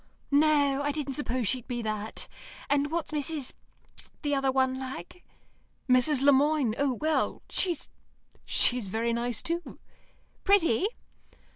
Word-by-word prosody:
"No; 285 -1 +3
I 290 - 0
didn't 285 -2 -3
suppose 255 -4 -1
she'd 250 +3 0
be 240 -2 -3
that. 215 0 -3 0.4
And 285 0 +2
what's 330 0 -3
Mrs. 295 -2 -2 0.7
the 290 -1 0
other 270 -1 +1
one 260 0 +1
like?" 260 - -8 0.6
"Mrs. 255 +2 +3
Le 285 - +7
Moine. 285 -4 +2
Oh, 280 -2 +2
well 310 +5 -1
she's 355 -3 +1 0.6
she's 245 -4 +3
very 230 +4 -1
nice, 235 -1 -2
too." 340 +1 -3 0.7
"Pretty?" 380 - +3
275 Hz, 130 wpm, -28 LUFS, 245-300 Hz, 0.7 s, Le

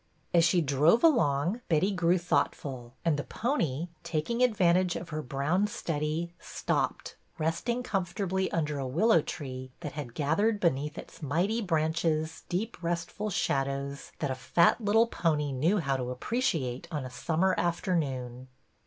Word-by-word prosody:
As 170 -1 +6
she 170 +1 +4
drove 150 - +3
along 185 - +3
Betty 175 +5 +3
grew 180 -1 +2
thoughtful, 135 -7 -1
and 160 -3 +3
the 145 - -2
pony, 170 - -1
taking 205 +10 -2
advantage 185 -7 +3
of 170 - -6
her 155 0 -3
brown 150 +9 0
study, 165 -2 -2
stopped, - - -2 0.2
resting 170 +10 -1
comfortably 190 -2 -1
under 150 -3 -1
a 135 - -2
willow 170 - +4
tree 130 -4 -6
that 150 -4 -4
had 135 -6 -7
gathered 200 +9 +1
beneath 150 -3 0
its - - -10
mighty 175 - 0
branches 160 -2 0
deep 205 +5 -3
restful 170 +5 -2
shadows 140 -4 -1
that 145 -3 -2
a - - +1
fat 170 - +3
little 220 +3 +5
pony 155 -9 0
knew 155 +10 +2
how 140 -7 0
to 125 -1 -3
appreciate 160 - -1
on 150 -5 -3
a 130 - -7
summer 165 +8 +1
afternoon. 135 -8 -1
165 Hz, 145 wpm, -29 LUFS, 140-185 Hz, 0.2 s, As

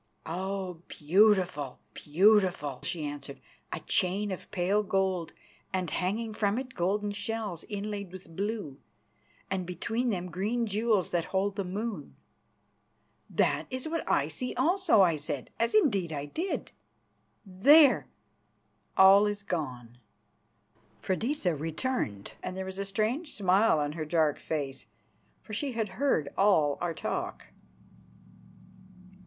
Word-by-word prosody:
"Oh, 185 0 -4
beautiful, 180 -4 +2 0.2
beautiful!" 175 -5 +2
she 160 -3 -3
answered. 145 -1 -7 0.3
"A - - -4
chain 195 +3 0
of 185 - -6
pale 195 +2 +1
gold, 190 -4 0 0.4
and 185 -4 -2
hanging 215 +5 -1
from 210 0 0
it 255 0 -5
golden 205 +4 0
shells 210 -4 -3
inlaid 205 -2 -4
with 180 -3 -11
blue, 200 -8 -3 0.7
and 190 -1 0
between 225 +8 -2
them 180 -4 -3
green 215 +7 -1
jewels 215 -3 +1
that 170 -2 0
hold 195 +1 -1
the 200 - -1
moon." 195 -3 -5 1.1
"That - - +1
is 255 +2 -4
what 330 +1 -2
I - - +2
see 250 - -5
also," 320 - +3
I 170 -4 +4
said, 145 -3 -5
as 230 -1 +1
indeed 200 - +3
I 145 -2 -3
did. 335 - -3 0.7
"There! 270 +10 +6 0.9
All 195 +2 +8
is 205 -1 -3
gone." 125 -10 -4 1.0
Freydisa 200 - 0
returned 155 - -3
and 185 - -5
there 190 - -3
was 190 +1 -7
a 200 - -2
strange 220 - -1
smile 195 0 +4
on 145 -1 0
her 155 0 -4
dark 155 -2 +1
face, 140 -4 -4 0.6
for 215 - -10
she 270 +5 -2
had 220 -3 -1
heard 250 - 0
all 160 -8 +4
our 175 -2 -1
talk. - - -4
190 Hz, 130 wpm, -29 LUFS, 165-215 Hz, 1.1 s, All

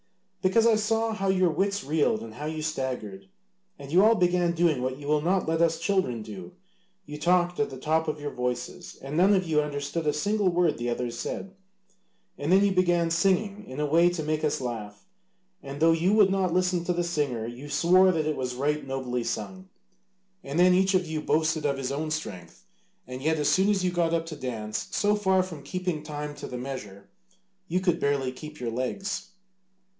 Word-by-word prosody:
"Because 205 +5 +3
I 230 -1 +5
saw 225 +1 0
how 195 -2 -2
your 185 -2 +3
wits 200 +4 -1
reeled 145 -6 +1
and 115 -1 -9
how 150 +6 -6
you 155 0 -4
staggered; 125 -10 -4 0.5
and 140 0 -10
you 180 +4 +5
all 225 +2 +6
began 175 -2 +2
doing 165 -6 +2
what 130 +1 -2
you 145 - -10
will 150 0 +2
not 180 +3 +1
let 165 0 +1
us 165 -1 +3
children 165 - 0
do 95 -5 -9 0.5
you 150 0 -8
talked 175 +1 +2
at 220 - +1
the 135 - -8
top 160 +4 0
of 155 0 -2
your 145 0 -4
voices, 125 -1 -4
and 135 +2 -6
none 190 +5 +5
of 185 -1 +1
you 155 -2 +3
understood 145 +2 -3
a 150 - +2
single 200 +5 +1
word 175 -5 +1
the 120 0 -2
others 120 0 -3
said, 190 +9 -5 0.9
and 145 +4 -1
then 195 +2 +6
you 200 - +2
began 175 -2 +2
singing 195 +4 +1
in 130 - -7
a 150 - +1
way 165 +4 +4
to 175 -3 -3
make 155 +1 -1
us 150 - 0
laugh, 110 -5 -6 0.6
and 140 +1 -8
though 165 +1 +5
you 170 +4 +2
would 205 -3 +5
not 190 -2 +1
listen 180 0 +1
to 180 - +1
the 175 0 0
singer 145 -9 -1
you 120 +5 -8
swore 185 +4 +5
that 160 -3 -1
it 155 -1 0
was 125 -1 -3
right 145 +2 -1
nobly 130 -2 -2
sung, 185 +8 -5 0.7
and 140 +3 -4
then 180 +1 +6
each 190 +1 +3
of 185 -1 +2
you 155 -1 -3
boasted 155 0 +1
of 140 -2 0
his 135 -1 -3
own 155 +3 -2
strength, 95 - -6 0.4
and 125 +1 -7
yet 160 +3 +1
as 150 -1 0
soon 190 +2 +3
as 200 -3 +1
you 180 - +1
got 170 -1 +1
up 165 0 -1
to 165 -1 -7
dance, 115 -6 -4
so 210 0 +1
far 190 -2 +2
from 170 -6 -8
keeping 180 -1 -3
time 150 -1 -6
to 145 - -8
the 125 - -6
measure, 105 -7 -7 0.6
you 180 +3 0
could 180 -3 +1
barely 140 -2 0
keep 150 +4 -10
your 120 -2 -3
legs. 130 - -3
155 Hz, 210 wpm, -27 LUFS, 135-180 Hz, 0.9 s, all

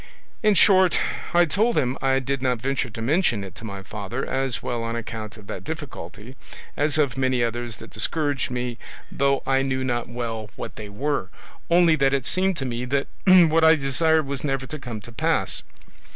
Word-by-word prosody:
In 215 -2 +4
short, 185 -1 +5 0.3
I 175 0 +5
told 215 +9 +1
him 125 0 +1
I 135 0 +2
did 135 0 -2
not 125 -2 +1
venture 130 +1 -1
to 115 +1 -7
mention 135 - +2
it 95 - -8
to - - -12
my 100 -3 -6
father, 105 +6 -5
as 135 -2 -1
well 120 -1 -2
on 115 0 -3
account 110 -2 -6
of 105 - -13
that - - -6
difficulty, 130 - -7 0.4
as 150 +1 +1
of 140 -5 +1
many 130 -2 +1
others 120 -1 -3
that 115 - -12
discouraged 145 -4 0
me 125 -1 -3 0.3
though 140 0 +1
I 135 0 +2
knew 130 -1 -1
not 120 -2 -2
well 115 -3 -4
what - - -7
they 105 -1 -8
were, 120 -1 -2 0.4
only 170 -1 +5
that 135 -1 +3
it 135 -3 -2
seemed 190 -1 +1
to 135 - -3
me 120 -1 -3
that 135 +2 -1 0.2
what 165 -3 +6
I 160 0 +7
desired 155 +2 +2
was 135 -1 -4
never 135 -2 -1
to 155 +3 -7
come 120 -5 -6
to 120 - -11
pass. 115 - 0
130 Hz, 195 wpm, -24 LUFS, 120-150 Hz, 0.4 s, I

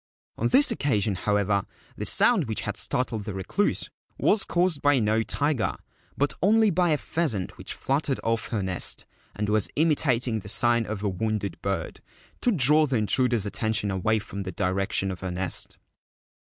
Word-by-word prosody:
On - - 0
this 270 0 +4
occasion, 110 - 0
however, 100 +1 0 0.3
the - - -4
sound - - +4
which - - -3
had - - -4
startled 115 -4 -2
the 105 -3 -5
Recluse 95 - 0 0.3
was 210 - +2
caused 175 -4 0
by 145 -1 +4
no 110 -1 +2
tiger, 140 0 0 0.4
but 145 +1 +1
only 215 +2 +4
by 175 0 +2
a 150 - +3
pheasant 130 - -2
which - - -5
fluttered 135 0 -1
off 115 0 0
her 105 -4 -2
nest, 95 -1 -2 0.3
and 105 0 -2
was 105 -1 +1
imitat 145 -6 +2
ing 110 -2 -1
the 105 - -8
sign 120 +1 +3
of 105 -1 -4
a 105 - +1
wounded 105 +1 -3
bird, 95 -4 -3 0.4
to 245 - +2
draw 150 - +5
the 130 -3 0
intruder's 115 0 +1
attention 105 0 -1
away 95 +4 +1
from 100 -1 -6
the 95 -1 -5
direction 95 +1 -1
of 90 - -7
her 95 - -4
nest. 90 0 -4
110 Hz, 175 wpm, -26 LUFS, 100-145 Hz, 0.4 s, draw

